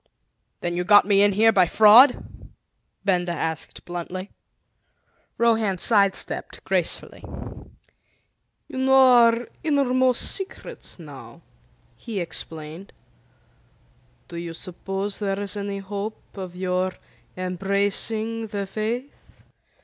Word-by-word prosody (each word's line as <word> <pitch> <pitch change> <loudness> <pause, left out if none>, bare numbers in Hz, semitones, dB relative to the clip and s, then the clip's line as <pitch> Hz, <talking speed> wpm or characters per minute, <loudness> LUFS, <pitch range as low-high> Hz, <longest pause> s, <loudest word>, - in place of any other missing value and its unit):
"Then 175 0 -2
you 180 - -1
got 205 +2 +6
me 200 -1 +3
in 205 0 +4
here 220 +3 +4
by 185 -4 +4
fraud?" 220 +9 +6 0.8
Benda 180 -3 +1
asked 160 -1 -4
bluntly. 180 +2 -6 1.1
Rohan 225 -4 +2
side 200 0 +3
stepped - - -1
gracefully. - - -1 1.4
"You 260 - -6
know 265 0 +3
our 240 -2 +5 0.2
innermost 260 -4 +2
secrets 385 -1 -5
now," - - -12 0.6
he 225 -5 -5
explained. 165 +1 -7 1.3
"Do 170 - -9
you 170 -1 -6
suppose 195 +3 -4
there 195 -1 -2
is 200 -1 -4
any 200 -1 -4
hope 200 +2 -7
of 185 -3 -7
your 185 0 -1 0.4
embracing 200 +5 -1
the 205 -2 -4
Faith?" 225 +7 -4
200 Hz, 105 wpm, -23 LUFS, 185-225 Hz, 1.4 s, got